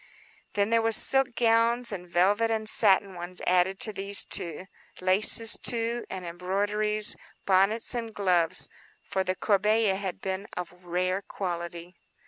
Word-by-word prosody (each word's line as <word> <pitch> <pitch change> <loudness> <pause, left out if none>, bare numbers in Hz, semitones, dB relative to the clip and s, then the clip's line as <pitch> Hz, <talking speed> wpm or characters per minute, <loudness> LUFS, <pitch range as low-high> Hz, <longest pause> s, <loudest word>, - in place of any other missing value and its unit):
Then 205 +1 0
there 230 0 +3
were 225 0 0
silk 270 +2 +4
gowns, 235 +1 +2
and 180 -3 -7
velvet 200 +6 +2
and 220 -1 -2
satin 200 -2 +3
ones 175 +1 -8
added 185 +2 +1
to 215 - 0
these; 200 0 +1 0.7
laces, 205 +4 +4
too, 235 0 0
and 185 -2 -7
embroideries; 205 +5 -1 0.3
bonnets 195 +5 +2
and 230 -2 -4
gloves; 180 -6 +1 0.4
for 190 -1 -2
the 185 0 -2
corbeille 210 0 +1
had 195 -2 -5
been 190 +1 -5
of 175 -1 -5
rare 185 +2 -2
quality. 175 -2 -6
200 Hz, 135 wpm, -27 LUFS, 185-225 Hz, 0.7 s, silk